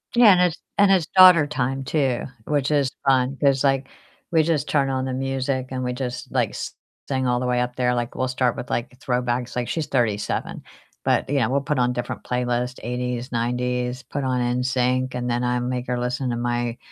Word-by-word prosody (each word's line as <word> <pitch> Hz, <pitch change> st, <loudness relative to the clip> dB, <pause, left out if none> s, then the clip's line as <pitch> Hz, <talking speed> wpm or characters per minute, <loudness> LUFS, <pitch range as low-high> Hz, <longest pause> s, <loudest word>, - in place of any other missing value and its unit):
Yeah, 235 Hz, -3 st, +8 dB
and 180 Hz, -, +3 dB
it's 180 Hz, -1 st, +2 dB, 0.2 s
and 200 Hz, -1 st, +5 dB
it's 175 Hz, -5 st, +3 dB
daughter 180 Hz, -5 st, +8 dB
time 135 Hz, -2 st, -2 dB
too, 135 Hz, -3 st, 0 dB, 0.2 s
which 145 Hz, -2 st, 0 dB
is 140 Hz, -3 st, +2 dB, 0.2 s
fun 135 Hz, 0 st, +3 dB
'cause, 140 Hz, -2 st, +3 dB
like, 135 Hz, -1 st, +2 dB, 0.4 s
we 160 Hz, -2 st, +4 dB
just 155 Hz, -3 st, 0 dB
turn 140 Hz, -2 st, +1 dB
on 130 Hz, 0 st, -1 dB
the 130 Hz, -, -3 dB
music 135 Hz, 0 st, -2 dB
and 130 Hz, -1 st, -3 dB
we 125 Hz, 0 st, -1 dB
just, 125 Hz, -1 st, -5 dB
like, -, -, +1 dB
s -, -, -6 dB, 0.3 s
sing 130 Hz, -2 st, 0 dB
all 125 Hz, 0 st, +1 dB
the 125 Hz, -, -2 dB
way 125 Hz, 0 st, +1 dB
up 125 Hz, 0 st, -3 dB
there. 125 Hz, -1 st, +1 dB
Like, 120 Hz, -1 st, -3 dB
we'll 130 Hz, -, 0 dB
start 125 Hz, -1 st, 0 dB
with, 125 Hz, -, -7 dB
like, 120 Hz, -, -1 dB
throwbacks, 125 Hz, -2 st, -1 dB
like, 125 Hz, -1 st, -1 dB
she's 160 Hz, -3 st, -2 dB
37, 110 Hz, -7 st, -1 dB, 0.4 s
but, -, -, +1 dB
you 140 Hz, 0 st, +2 dB
know, 110 Hz, -3 st, +1 dB
we'll 140 Hz, +1 st, +1 dB
put 145 Hz, +1 st, -1 dB
on 125 Hz, 0 st, +2 dB
different 120 Hz, -1 st, -4 dB
playlists, 125 Hz, 0 st, -2 dB
'80s, 125 Hz, +1 st, -3 dB
'90s, 125 Hz, +1 st, -1 dB
put 140 Hz, +3 st, -4 dB
on 130 Hz, -1 st, 0 dB
NSYNC, 125 Hz, +1 st, 0 dB
and 125 Hz, 0 st, -2 dB
then 120 Hz, +1 st, 0 dB
I 125 Hz, 0 st, +1 dB
make 125 Hz, 0 st, -2 dB
her 125 Hz, 0 st, -1 dB
listen 125 Hz, +1 st, -2 dB
to 120 Hz, -, -1 dB
my 120 Hz, 0 st, -1 dB
125 Hz, 215 wpm, -23 LUFS, 125-135 Hz, 0.4 s, Yeah